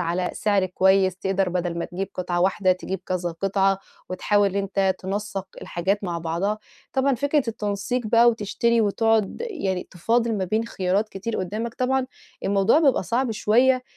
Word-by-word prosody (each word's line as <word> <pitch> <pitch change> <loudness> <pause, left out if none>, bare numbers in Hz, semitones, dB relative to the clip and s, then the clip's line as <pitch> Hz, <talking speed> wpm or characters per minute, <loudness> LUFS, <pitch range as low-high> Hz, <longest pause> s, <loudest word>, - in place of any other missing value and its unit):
على 175 +1 -1
سعر 200 -3 +1
كويس 190 0 +3
تقدر 190 0 0
بَدَل 175 -1 -2
ما - - -2
تجيب 190 +2 -4
قطعة 175 -1 -2
واحدة 190 0 +3
تجيب 185 +1 -5
كذا 180 -1 -1
قطعة 195 +2 +1 0.3
وتحاول 200 +1 +1
أنت 195 -1 +1
تنسَّق 195 0 -4 0.2
الحاجات 195 +4 -1
مع 170 -2 -2
بعضها، 170 +6 -1 0.3
طبعًا 270 +1 +2
فكرة 285 +3 +1
التنسيق 215 +2 -2
بقى 235 +2 +5
وتشتري 230 +1 +1
وتقعُد 220 0 +1
يعني 190 - -3
تفاضِل 230 +6 +1
ما 190 - 0
بين 215 +5 0
خيارات 195 +1 0
كتير 215 +3 -4
قُدّامك 215 +5 -3
طبعًا، 260 0 0 0.4
الموضوع 200 +7 +3
بيبقى 285 -5 +3
صعب 245 +1 0
شوية 250 +4 +3
200 Hz, 155 wpm, -24 LUFS, 185-230 Hz, 0.4 s, بقى